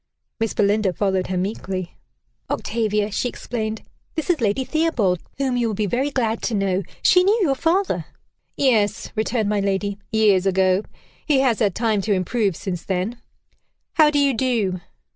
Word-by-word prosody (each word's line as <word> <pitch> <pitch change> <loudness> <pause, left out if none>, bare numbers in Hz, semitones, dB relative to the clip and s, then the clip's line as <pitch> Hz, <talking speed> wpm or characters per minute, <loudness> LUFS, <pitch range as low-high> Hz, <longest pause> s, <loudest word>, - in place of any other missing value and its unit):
Miss 225 -1 -1
Belinda 205 -2 +2
followed 190 -1 0
her 185 - -2
meekly. 185 -1 -3 0.5
"Octavia," 210 -2 -1
she 245 +4 -1
explained, 220 -3 -4 0.3
"this 320 +2 0
is 320 -6 -1
Lady 220 +4 +1
Theobald, 250 - +1 0.2
whom 265 -2 0
you 240 -1 +1
will 215 - -2
be 210 - 0
very 255 +8 0
glad 235 -5 -1
to 230 - -1
know. 195 -1 +1 0.2
She 360 0 +6
knew 405 +4 +3
your 285 -6 +3
father." 350 +8 0 0.5
"Yes," 220 -6 +1
returned 220 -1 0
my 210 -1 +1
lady, 200 0 -1
"years 205 -4 +3
ago. 190 0 +3 0.5
He 285 -4 +4
has 250 -5 +2
had 205 -6 +1
time 220 -3 +1
to 205 +1 +1
improve 195 +1 0
since 180 -1 -5
then. 190 +6 -2 0.7
How 310 -2 +6
do 295 - 0
you 280 -1 +3
do?" 225 -7 0
215 Hz, 165 wpm, -22 LUFS, 195-255 Hz, 0.7 s, She